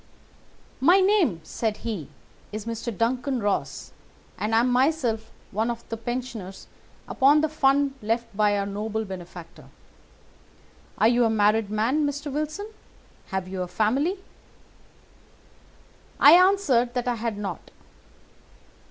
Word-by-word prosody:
"'My 345 +9 +5
name,' 375 - +2
said 215 +5 -3
he, 200 - -4 0.4
'is 215 0 -6
Mr. 230 -2 -5
Duncan 250 +3 0
Ross, 205 -2 -2 0.4
and 215 +1 -1
I 225 - +5
am 250 +1 +1
myself 250 -4 +1 0.2
one 220 +4 -1
of 235 -1 -5
the 225 - -3
pensioners 230 -5 -6 0.4
upon 285 +3 +4
the 315 - +2
fund 280 -2 +2
left 225 +2 -1
by 205 0 +2
our 200 - -1
noble 215 +2 -3
benefactor. 175 -3 -10 1.3
Are - - +4
you 240 +1 +3
a 225 - +3
married 215 0 +2
man, 225 +8 +1
Mr. 290 0 -3
Wilson? 305 +7 -3 0.6
Have 190 -2 -3
you 185 0 -5
a 180 - -3
family?' 265 - 0 2.0
"I 285 - +8
answered 340 -10 +4
that 245 0 -2
I 245 - +2
had 225 -2 -3
not. 205 -1 -6
230 Hz, 130 wpm, -25 LUFS, 210-275 Hz, 2.0 s, I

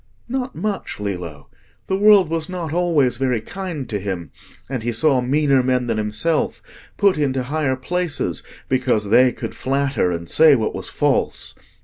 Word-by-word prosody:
"Not 255 +1 -3
much, 205 - -3
Lillo. 90 -8 -5 0.4
The 190 - -1
world 200 -2 +6
was 160 0 -2
not 175 -4 -4
always 160 -8 +2
very 130 -3 0
kind 165 - -6
to 105 - -3
him, 95 -5 -5 0.4
and 130 -2 -3
he 120 +2 -1
saw 130 +3 +2
meaner 140 +1 +2
men 125 -1 +1
than 115 -2 -1
himself 105 +10 -1 0.3
put 200 -6 +3
into 135 -3 0
higher 145 0 -1
places, 145 - -2 0.3
because 125 -5 +1
they 125 +3 +5
could - - -6
flatter 135 -6 0
and 85 -1 -4
say 155 - +6
what 110 -4 -1
was - - -5
false. - - 0
130 Hz, 160 wpm, -21 LUFS, 115-165 Hz, 0.4 s, world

